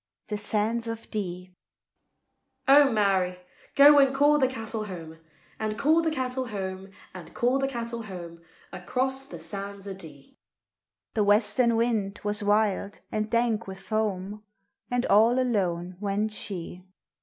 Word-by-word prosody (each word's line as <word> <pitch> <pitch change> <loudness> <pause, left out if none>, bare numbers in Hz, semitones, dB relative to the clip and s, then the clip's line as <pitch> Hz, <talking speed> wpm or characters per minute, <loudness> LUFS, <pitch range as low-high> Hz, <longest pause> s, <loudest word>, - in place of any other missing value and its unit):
THE 210 - -2
SANDS 220 +3 +1
O' 230 - -2
DEE. 185 -5 -6 1.1
"O 280 0 +7
Mary, 190 -4 +1 0.4
go 290 +1 +8
and 270 -1 +4
call 295 +2 +4
the 260 - +4
cattle 225 -3 -5
home, 165 -5 -9 0.4
And 215 -1 -2
call 315 +6 +3
the 325 - 0
cattle 260 -3 -2
home, 190 -2 -5 0.2
And 185 -2 -10
call 250 +3 +2
the 270 - 0
cattle 235 -2 -5
home, 175 -5 -9 0.3
Across 265 +8 -2
the - - -9
sands 200 0 -7
o' 195 - -4
Dee!" 155 -7 -12 0.7
The 215 - +1
western 210 +3 +3
wind 220 -4 0
was 205 0 +1
wild 205 -1 0
and 215 0 -2
dank 230 -2 0
wi' 190 - -6
foam, 210 -1 -3 0.5
And 245 0 0
all 225 +4 +4
alone 185 -7 -1
went 205 +1 -1
she. 180 -3 -6
215 Hz, 145 wpm, -27 LUFS, 195-240 Hz, 1.1 s, go